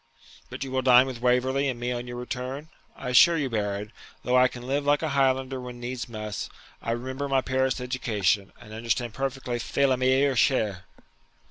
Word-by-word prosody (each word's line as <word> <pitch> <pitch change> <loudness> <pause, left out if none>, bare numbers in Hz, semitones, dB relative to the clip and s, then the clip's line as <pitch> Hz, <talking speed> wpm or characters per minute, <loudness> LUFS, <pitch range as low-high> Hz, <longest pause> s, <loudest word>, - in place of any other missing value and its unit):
'But - - -5
you 135 - -6
will 130 0 0
dine 125 0 +6
with 130 -3 -6
Waverley 130 +3 +2
and 125 -2 -4
me 120 +1 -2
on 120 0 -4
your 120 - -6
return? 130 +4 -5 0.3
I - - -6
assure 165 +7 +6
you, 140 -5 -1
Baron, 105 -1 -2 0.3
though 125 - +1
I 125 0 +6
can 125 -1 -9
live 140 +3 0
like 145 +2 +2
a 160 - 0
Highlander 135 -1 +1
when 125 -1 -8
needs 120 0 -5
must, 105 -3 -5 0.3
I - - -5
remember 130 +4 -3
my 135 -1 +3
Paris 130 0 0
education, 105 -6 0
and 110 - -12
understand 115 +1 -2
perfectly 135 -2 -3
faire 140 +4 0
la 130 -2 +2
meilleure 130 +2 +3
chere.' 105 -6 +1
125 Hz, 195 wpm, -26 LUFS, 120-135 Hz, 0.3 s, dine